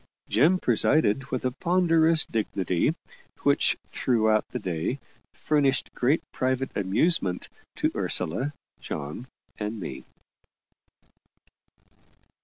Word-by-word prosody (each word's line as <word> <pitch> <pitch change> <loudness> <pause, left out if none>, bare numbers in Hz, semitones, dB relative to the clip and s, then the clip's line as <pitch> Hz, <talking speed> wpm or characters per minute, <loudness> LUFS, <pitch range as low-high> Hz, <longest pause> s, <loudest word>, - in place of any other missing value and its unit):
Jem 155 +11 +4
presided 135 - +2
with 130 -2 -4
a 130 - +1
ponderous 165 +1 +3
dignity 95 -5 0 0.5
which - - +3
throughout 110 -3 +1
the - - -4
day 90 - -2 0.4
furnished 140 -3 +1
great 135 +6 +1
private 130 +1 -1
amusement 100 - +1 0.3
to - - 0
Ursula, 130 - -1 0.3
John, 75 - -6 0.3
and 105 +1 -3
me. 70 -8 -6
125 Hz, 90 wpm, -26 LUFS, 100-145 Hz, 0.5 s, Jem